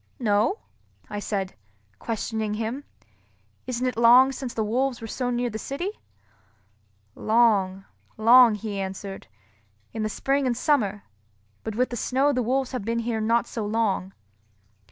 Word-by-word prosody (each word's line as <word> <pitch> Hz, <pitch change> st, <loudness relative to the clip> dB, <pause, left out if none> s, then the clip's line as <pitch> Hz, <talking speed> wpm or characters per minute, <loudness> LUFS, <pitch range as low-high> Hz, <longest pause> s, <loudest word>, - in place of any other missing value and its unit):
"No?" 220 Hz, -, +1 dB, 0.5 s
I 205 Hz, -, -3 dB
said, 195 Hz, -2 st, -3 dB, 0.5 s
questioning 220 Hz, -1 st, -3 dB
him. 230 Hz, +6 st, -4 dB, 0.8 s
"Isn't 255 Hz, 0 st, -2 dB
it 255 Hz, -, -1 dB
long 245 Hz, +3 st, +6 dB
since 260 Hz, -2 st, -5 dB
the 225 Hz, -, -2 dB
wolves 245 Hz, +4 st, 0 dB
were 225 Hz, -, -7 dB
so 245 Hz, +3 st, -3 dB
near 245 Hz, 0 st, -1 dB
the 220 Hz, -, -5 dB
city?" 300 Hz, -, -4 dB, 1.2 s
"Long, 205 Hz, -4 st, +2 dB, 0.3 s
long," 235 Hz, +1 st, +7 dB
he 205 Hz, -1 st, -5 dB
answered, 195 Hz, 0 st, -6 dB, 0.7 s
"in 220 Hz, -, -4 dB
the 215 Hz, -, -1 dB
spring 275 Hz, +5 st, 0 dB
and 240 Hz, -2 st, 0 dB
summer; 215 Hz, -8 st, +1 dB, 0.6 s
but 220 Hz, -, -4 dB
with 250 Hz, +2 st, 0 dB
the -, -, -3 dB
snow 270 Hz, +5 st, +1 dB
the 250 Hz, -, 0 dB
wolves 260 Hz, +2 st, 0 dB
have 250 Hz, -5 st, -4 dB
been 230 Hz, +3 st, -1 dB
here 230 Hz, -1 st, -1 dB
not 230 Hz, +2 st, +2 dB
so 230 Hz, -2 st, -5 dB
long." 205 Hz, -3 st, -1 dB
230 Hz, 150 wpm, -25 LUFS, 210-250 Hz, 1.2 s, long